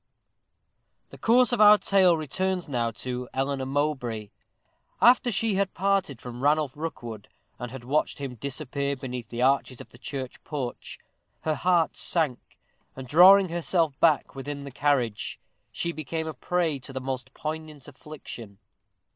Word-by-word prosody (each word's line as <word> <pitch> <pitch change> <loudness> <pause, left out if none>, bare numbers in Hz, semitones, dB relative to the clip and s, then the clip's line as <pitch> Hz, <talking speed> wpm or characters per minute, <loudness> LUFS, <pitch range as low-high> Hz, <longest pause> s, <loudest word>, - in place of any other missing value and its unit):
_ - - -46
The - - -12
course 250 +3 +4
of 240 -3 +1
our 210 0 +9
tale 190 -4 +4
returns 180 +4 -2
now 120 -5 0 0.2
to 125 -1 -4
Eleanor 135 0 -1
Mowbray. 130 -7 -2 0.7
After 245 0 +5
she 225 +1 +1
had 195 -1 -1
parted 195 -8 0
from 125 0 -8
Ranulph 145 -1 +2
Rookwood, 120 -9 -6 0.3
and 125 0 -5
had 130 0 -9
watched 145 +5 0
him 140 -3 -5
disappear 140 +2 -3
beneath 125 -3 -6
the 120 +1 -2
arches 130 -1 +1
of - - -11
the 120 - -17
church 135 -2 -6
porch, 135 -5 -5 0.4
her 155 - 0
heart 170 0 +2
sank, 155 -8 -1 0.4
and, 130 -1 -8
drawing 185 +6 +7
herself 165 -3 0
back 160 -3 +3
within 140 +1 -6
the 140 - -8
carriage, 130 -6 0 0.3
she 170 - -2
became 160 0 -4
a 160 - -4
prey 165 0 -1
to 135 - -8
the 130 - -4
most 130 0 -5
poignant 155 -2 -6
affliction. 130 -8 -10
145 Hz, 155 wpm, -26 LUFS, 130-165 Hz, 0.7 s, our